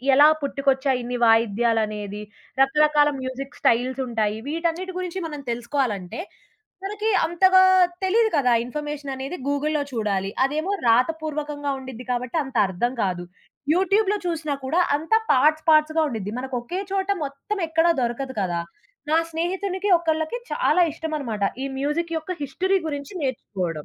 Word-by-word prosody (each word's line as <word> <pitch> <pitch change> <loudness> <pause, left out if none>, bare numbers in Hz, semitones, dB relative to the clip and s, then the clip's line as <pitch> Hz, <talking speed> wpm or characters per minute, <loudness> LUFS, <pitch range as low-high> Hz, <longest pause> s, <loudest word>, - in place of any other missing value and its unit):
ఎలా 290 +2 +8 0.2
పుట్టుకొచ్చాయి 275 -1 +1
ఇన్ని 245 +1 -3
వాయిద్యాలనేది. 215 -2 +1 0.4
రకరకాల 295 +2 +4
మ్యూజిక్ 260 +2 -6
స్టైల్స్ 255 +3 +2
ఉంటాయి. 215 -3 -1
వీటన్నిటి 335 +4 -2
గురించి 365 0 -4
మనం 300 -2 -7
తెలుసుకోవాలంటే, 235 - -2 0.7
మనకి 420 +2 -1 0.2
అంతగా 375 +3 +5 0.4
తెలీదు 440 +4 +3
కదా! 250 -3 +3
ఇన్ఫర్మేషన్ 295 +1 -5
అనేది 270 +6 -5
గూగుల్‌లో 295 +1 0
చూడాలి. 200 -4 -1 0.2
అదేమో 310 +7 -2 0.2
రాతపూర్వకంగా 295 +3 0
ఉండిద్ది 260 -2 -9
కాబట్టి 250 +3 -2
అంత 270 -2 -8
అర్థం 215 +7 -1
కాదు. 180 -2 -2 0.5
యూట్యూబ్‌లో 395 +4 +2
చూసినా 320 -4 -2
కూడా 315 +7 +1 0.2
అంత 320 +8 -1 0.2
పార్ట్స్ 305 +4 +4
పార్ట్స్‌గా 315 +1 +4
ఉండిద్ది. 215 -6 -4
మనకు 260 +1 -5
ఒకే 350 +11 -4
చోట 385 0 -1 0.2
మొత్తం 280 +9 -5
ఎక్కడ 325 +1 +2
దొరకదు 255 +2 -2
కదా! 175 -3 -1 0.5
నా 315 - +4
స్నేహితునికి 375 +4 -2
ఒకళ్ళకి 320 +5 -1
చాలా 360 - +3
ఇష్టం 320 0 -6
అనమాట. 225 -7 -4 0.2
ఈ - - -2
మ్యూజిక్ 310 +5 -1
యొక్క 320 +3 -4
హిస్టరీ 370 +8 0
గురించి 285 0 -5
నేర్చుకోవడం. 185 - -3
285 Hz, 135 wpm, -23 LUFS, 240-330 Hz, 0.7 s, ఎలా